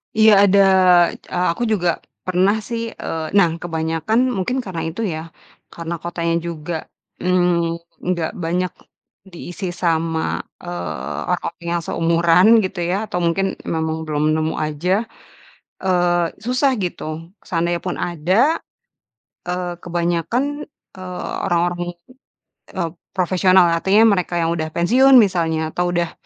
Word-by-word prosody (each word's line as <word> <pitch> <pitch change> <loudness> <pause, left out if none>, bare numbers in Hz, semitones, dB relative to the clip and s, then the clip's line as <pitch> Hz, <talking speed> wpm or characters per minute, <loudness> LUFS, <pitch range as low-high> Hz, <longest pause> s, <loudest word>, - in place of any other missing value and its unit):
Iya 220 0 +6 0.2
ada, 200 +1 +4 0.6
eee, 180 0 -2
aku 205 - -3
juga 180 -4 +1 0.4
pernah 185 +3 +2
sih, 230 +2 -4
eee 160 -1 -4
nah 195 -5 +5
kebanyakan, 165 +5 -1 0.2
mungkin 250 +8 -1
karena 180 -6 -5
itu 170 +8 -5
ya, 160 -6 -2 0.5
karena 170 0 -5
kotanya 170 -1 -1
juga, 170 0 -5 0.5
mmm, 175 -2 +1 0.3
nggak 170 -3 0
banyak 180 +2 -1 0.6
diisi 175 0 -7
sama, 165 -2 0 0.2
eee, 85 -3 -5
orang - - -2
yang 170 0 -2
seumuran 170 +3 +3 0.2
gitu 185 -1 -4
ya, 185 - +1
atau 180 - -2
mungkin 180 +3 +1 0.2
memang 160 -1 -1
belum 150 0 -1
nemu 155 0 0
aja, 170 +7 0 0.8
eee, 175 -2 +2 0.2
susah 255 +2 +2
gitu. 165 -2 -5
Seandainya 170 0 -1
pun 180 - -4
ada, 185 - +1 0.9
eee, 180 0 -2
kebanyakan, 175 +8 -1 0.5
eee, 185 -1 -6
orang-orang, 175 -1 0 1.0
eee, 170 -3 -1 0.3
profesional, 185 0 +4
artinya 195 +6 +3
mereka 180 -2 -1
yang 165 0 +1
sudah 160 -1 -2
pensiun 255 +11 +4
misalnya, 165 -7 +2
atau 180 0 0
udah, 170 -1 -1
175 Hz, 125 wpm, -20 LUFS, 165-185 Hz, 1.0 s, Iya